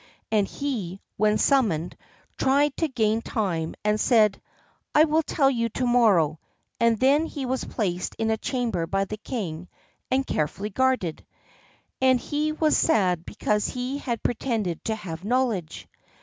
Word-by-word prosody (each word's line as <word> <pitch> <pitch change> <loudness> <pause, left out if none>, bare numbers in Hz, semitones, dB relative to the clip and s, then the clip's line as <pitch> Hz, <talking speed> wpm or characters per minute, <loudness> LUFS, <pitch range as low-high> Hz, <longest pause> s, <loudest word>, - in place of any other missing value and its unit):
And 210 -3 +2
he, 210 -10 -4 0.2
when 215 +1 +3
summoned, 210 - +2 0.4
tried 280 +2 +2
to 325 - +1
gain 225 -4 +1
time, 170 -9 -2
and 210 0 +2
said, 215 -3 +3 0.5
"I 300 - +8
will 315 0 +3
tell 290 -2 +1
you 230 -2 0
to 250 +3 -2
morrow," 200 -11 +3 0.4
and 230 -2 +3
then 285 +5 +3
he 280 -5 -5
was 260 +1 -1
placed 180 -5 -2
in 225 0 0
a 220 - +1
chamber 240 -10 -2
by 195 +2 0
the 215 +2 -6
king 180 -8 -5 0.4
and 265 +1 +1
carefully 190 - -2
guarded. 255 -8 0 0.8
And 260 -1 +4
he 300 +4 -1
was 310 0 +2
sad 180 - +2
because 210 -1 0
he 255 +3 -3
had 235 -5 -3
pretended 225 -8 -1
to 220 - 0
have 175 -5 -7
knowledge. 225 -7 -1
225 Hz, 150 wpm, -25 LUFS, 195-260 Hz, 0.8 s, I